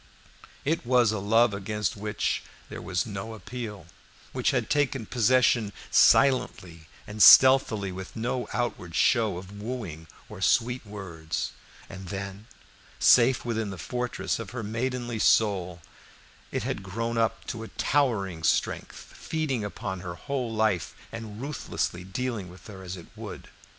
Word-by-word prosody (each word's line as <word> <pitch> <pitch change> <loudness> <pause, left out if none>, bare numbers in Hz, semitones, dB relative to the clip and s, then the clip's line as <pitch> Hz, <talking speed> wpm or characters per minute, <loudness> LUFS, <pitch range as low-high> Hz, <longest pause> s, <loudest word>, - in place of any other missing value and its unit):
It 160 +4 0
was 120 -2 +4
a 110 - -2
love 115 +3 +3
against 105 +1 -2
which 105 0 -2 0.3
there - - -7
was 90 0 -1
no 105 +1 -6
appeal, 110 -5 -7 0.5
which - - +1
had - - 0
taken 140 -5 0
possession 120 -2 +3 0.2
silently 90 - +3 0.2
and 105 0 -5
stealthily, 115 -6 +7
with 95 0 -8
no 120 +2 -2
outward 115 -8 -3
show 110 -7 +3
of 95 +2 -9
wooing 105 -9 -6 0.2
or - - -10
sweet 120 +2 +2
words; 85 -6 -5 0.4
and 95 0 -9
then, 100 +2 -6 0.5
safe 125 0 +5
within 110 -3 -1
the 95 - -6
fortress 125 +11 -3
of 115 -4 -6
her 120 -2 -5
maidenly 120 +1 -3
soul, 90 -7 +2 0.7
it - - -2
had - - -3
grown 115 +5 -3
up 115 -1 0
to 115 - -5
a 115 - -6
towering 105 - 0
strength, 80 - 0
feeding 150 -8 -3
upon 95 -2 -5
her 90 -2 -6
whole 130 +2 -3
life, 110 -6 0 0.2
and 110 -2 -7
ruthlessly 130 -9 -3
dealing 105 0 -4
with 90 +1 -15
her 100 -3 -10
as 95 0 -6
it 85 - -11
would. - - -9
110 Hz, 145 wpm, -27 LUFS, 95-120 Hz, 0.7 s, stealthily